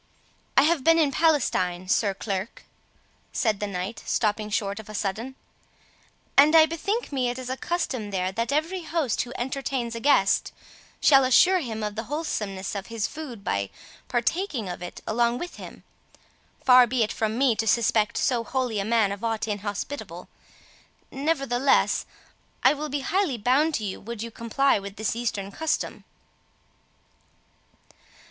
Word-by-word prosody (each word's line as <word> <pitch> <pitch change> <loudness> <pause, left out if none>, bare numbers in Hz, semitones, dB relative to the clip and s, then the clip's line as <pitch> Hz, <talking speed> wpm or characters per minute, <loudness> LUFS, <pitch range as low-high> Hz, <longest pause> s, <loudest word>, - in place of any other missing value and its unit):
"I - - +8
have 310 -2 +2
been 330 +3 +5
in 305 -4 +3
Palestine, 185 - +1
Sir 200 +1 +1
Clerk," 195 +2 -4 0.7
said 220 -5 0
the 210 - -2
knight, 195 +3 -4
stopping 210 -1 0
short 205 -1 -1
of 220 0 -11
a 215 - -7
sudden, 220 +7 -3 1.0
"and 295 +3 +7
I 320 -1 +9
bethink 395 +8 -3
me 255 -3 0
it 245 - -4
is 255 -1 -5
a - - -1
custom 265 -9 -2
there 185 -1 -1
that 230 +6 -2
every 325 +6 0
host 315 -7 -1
who 245 - -6
entertains 255 -1 -3
a 230 - -4
guest 260 -7 +3 0.5
shall 275 -2 +6
assure 360 +9 +5
him 225 -8 -4
of 210 0 -2
the 225 +2 -5
wholesomeness 210 -11 -3
of 200 -1 -5
his 230 -2 -2
food, 275 -9 -7
by 100 - -1 0.4
partaking 250 - -1
of 180 -1 -6
it 175 - -8
along 235 +2 +1
with 350 +6 -7
him. - - -11 0.8
Far 250 -1 +8
be 245 0 +1
it 215 - -2
from 220 0 -1
me 260 -3 +3
to 225 - -1
suspect 220 -1 +2
so 245 -3 +1
holy 250 -4 -1
a - - 0
man 220 -2 +2
of 200 +2 -6
aught 225 -1 -1
inhospitable; 205 +6 -5 0.8
nevertheless 275 -3 +1 0.6
I - - +6
will 300 +1 -5
be 285 0 -2
highly 345 -3 0
bound 275 +8 +2
to 220 - -2
you 195 -2 -4
would 230 0 -6
you 230 - -6
comply 230 +3 +1
with 200 0 -8
this 215 0 -2
Eastern 210 -4 -3
custom." 320 +9 -2
235 Hz, 160 wpm, -25 LUFS, 210-280 Hz, 1.0 s, I